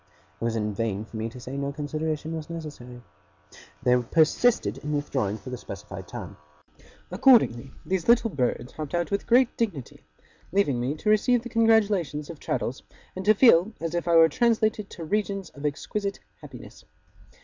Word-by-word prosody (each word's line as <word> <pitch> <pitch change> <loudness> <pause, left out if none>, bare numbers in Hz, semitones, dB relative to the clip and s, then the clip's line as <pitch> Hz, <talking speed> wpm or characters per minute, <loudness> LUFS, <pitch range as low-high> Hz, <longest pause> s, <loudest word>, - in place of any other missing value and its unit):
It - - -1
was 115 -1 -1
in 105 -1 -1
vain 105 -1 -2
for 110 - -14
me 110 +1 -3
to 125 - -11
say 125 +1 -9
that 140 - -4
no 140 0 -2
consideration 155 +2 -3
was 160 -1 -7
necessary. 145 -7 -8 0.8
They 125 -1 +4
persisted 160 - +2
in 150 +1 -4
withdrawing 130 -8 -1
for 130 - -10
the 125 - -5
specified - - -9
time. - - -8 0.7
Accordingly, 180 - +4
these 190 -2 -2
little 235 -1 +4
birds 125 -3 -2
hopped 155 0 -5
out 175 +2 -1
with 200 - -2
great 245 +1 +4
dignity; 180 - -3 0.5
leaving 170 -10 +1
me 130 +5 -1
to 210 - -2
receive 235 +3 +3
the 245 - -7
congratulations 205 - +2
of 160 - -12
Traddles, 125 0 -3 0.3
and 190 - -5
to 215 +1 +5
feel 215 -3 +5
as 165 0 -4
if 175 0 -2
I 170 - +3
were 165 0 +8
translated 215 +2 +1
to 165 - -8
regions 195 0 -2
of 140 +1 -4
exquisite 200 +7 -3 0.2
happiness. - - -12
160 Hz, 175 wpm, -26 LUFS, 130-205 Hz, 0.8 s, were